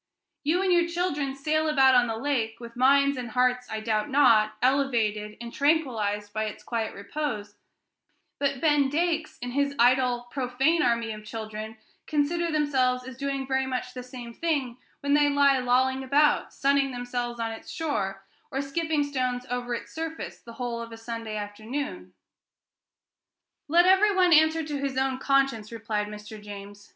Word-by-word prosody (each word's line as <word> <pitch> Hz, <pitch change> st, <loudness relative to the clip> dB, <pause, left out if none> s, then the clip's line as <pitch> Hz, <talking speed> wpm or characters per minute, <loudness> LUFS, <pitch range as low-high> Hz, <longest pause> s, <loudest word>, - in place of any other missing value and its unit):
You 340 Hz, +6 st, +2 dB
and 370 Hz, -2 st, +3 dB
your 345 Hz, -1 st, +3 dB
children 300 Hz, -6 st, -1 dB
sail 310 Hz, +3 st, 0 dB
about 270 Hz, -3 st, +5 dB
on 245 Hz, -1 st, +5 dB
the 225 Hz, -, -2 dB
lake, 230 Hz, -4 st, -1 dB
with 235 Hz, -1 st, -10 dB
minds 280 Hz, +2 st, +4 dB
and 245 Hz, -2 st, -5 dB
hearts, 250 Hz, +1 st, +1 dB
I 220 Hz, 0 st, -4 dB
doubt 215 Hz, +2 st, -1 dB
not, 230 Hz, -6 st, +5 dB
elevated 230 Hz, -6 st, +1 dB
and 235 Hz, 0 st, -8 dB
tranquilized 225 Hz, -9 st, 0 dB
by 215 Hz, 0 st, -1 dB
its 215 Hz, -, -7 dB
quiet 225 Hz, -2 st, -3 dB
repose; 215 Hz, -1 st, -4 dB, 0.9 s
but 275 Hz, -2 st, 0 dB
Ben 295 Hz, -3 st, +3 dB
Dakes, 320 Hz, +1 st, -1 dB
and 245 Hz, 0 st, -4 dB
his 280 Hz, 0 st, 0 dB
idle, 245 Hz, 0 st, +3 dB
profane 270 Hz, +5 st, +1 dB
army 235 Hz, -2 st, +1 dB
of 215 Hz, 0 st, -8 dB
children, 220 Hz, 0 st, -6 dB, 0.3 s
consider 330 Hz, +3 st, 0 dB
themselves 260 Hz, -4 st, +1 dB
as 260 Hz, -, -8 dB
doing 275 Hz, +1 st, -3 dB
very 265 Hz, 0 st, 0 dB
much 250 Hz, -1 st, -3 dB
the 250 Hz, -, -6 dB
same 245 Hz, -2 st, -9 dB
thing 275 Hz, -6 st, -1 dB, 0.2 s
when 285 Hz, 0 st, +1 dB
they 290 Hz, 0 st, +5 dB
lie 280 Hz, -1 st, +4 dB
lolling 260 Hz, +1 st, +2 dB
about, 290 Hz, +3 st, +3 dB
sunning 275 Hz, 0 st, +2 dB
themselves 245 Hz, -1 st, -4 dB
on 225 Hz, -1 st, -2 dB
its 225 Hz, -, -9 dB
shore, 195 Hz, -, -2 dB, 0.3 s
or 270 Hz, -, -3 dB
skipping 310 Hz, +2 st, 0 dB
stones 255 Hz, -3 st, -2 dB
over 245 Hz, -1 st, -2 dB
its -, -, -8 dB
surface 325 Hz, 0 st, -5 dB
the 235 Hz, -, -12 dB
whole 235 Hz, -1 st, -4 dB
of 230 Hz, 0 st, -8 dB
a 225 Hz, -, -8 dB
Sunday 225 Hz, -1 st, -5 dB
afternoon." 220 Hz, +8 st, -5 dB, 1.5 s
"Let 340 Hz, +4 st, +5 dB
every 385 Hz, +2 st, +5 dB
one 365 Hz, -2 st, +5 dB
answer 315 Hz, +1 st, +5 dB
to 295 Hz, -2 st, -4 dB
his 275 Hz, -1 st, -3 dB
own 265 Hz, -1 st, 0 dB
conscience," 270 Hz, -6 st, +1 dB
replied 220 Hz, -2 st, -2 dB
Mr. 210 Hz, 0 st, -9 dB
James. 205 Hz, 0 st, -10 dB
255 Hz, 165 wpm, -27 LUFS, 230-285 Hz, 1.5 s, about